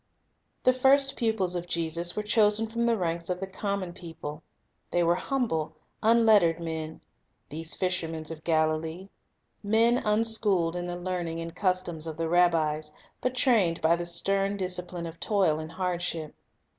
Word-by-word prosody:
The 255 - +5
first 270 +2 +3
pupils 220 -6 0
of 175 0 -3
Jesus 170 +1 -1
were 210 - -2
chosen 210 0 +4
from 230 +1 -4
the 235 -1 +2
ranks 170 -2 -2
of 180 0 -1
the 195 - -3
common 195 -1 -3
people. 160 -3 -8 0.5
They 175 - +1
were 170 0 +4
humble, 185 - -1 0.3
unlettered 215 -7 +4
men, 160 -1 -5 0.5
these 160 +3 -3
fishers 165 -4 -2
of 160 -1 -8
Galilee; 160 +3 0 0.5
men 225 +4 +3
unschooled 210 -5 +2
in 175 0 -3
the 175 0 -4
learning 175 -2 -3
and 165 +1 -6
customs 180 -5 -1
of 160 -1 -6
the 165 0 -1
rabbis, 160 -3 +2 0.3
but 255 0 -1
trained 215 -11 +3
by 160 +2 +3
the 170 0 -4
stern 195 +3 0
discipline 180 -2 -3
of 165 0 -8
toil 190 -8 +2
and 155 +1 -7
hardship. 175 -4 -2
175 Hz, 155 wpm, -27 LUFS, 165-210 Hz, 0.5 s, The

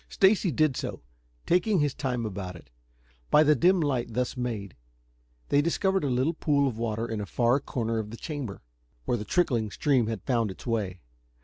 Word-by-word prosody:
Stacy 195 0 +3
did 155 -1 +2
so, - - -5 0.4
taking 185 +4 +2
his 145 -2 +1
time 125 -4 -2
about 95 -3 -5
it. 70 -7 -15 0.6
By 150 - +6
the 150 0 +5
dim 180 +7 +4
light 130 -7 -1
thus 125 0 -1
made, 115 -7 -4 0.7
they 140 - +4
discovered 190 +3 +1
a 140 - 0
little 130 +6 +1
pool 145 -3 +2
of 115 -4 -4
water 115 0 -2
in 110 -2 -3
a 100 - -5
far 120 +2 +2
corner 115 -4 -2
of 105 -1 -4
the 115 - -8
chamber, 140 - -6 0.4
where - - +1
the 105 - -5
trickling 120 - +1
stream 130 +1 +1
had 110 -5 -4
found 115 -4 +1
it's 95 - -10
way. 100 -7 -2
125 Hz, 190 wpm, -27 LUFS, 110-150 Hz, 0.7 s, By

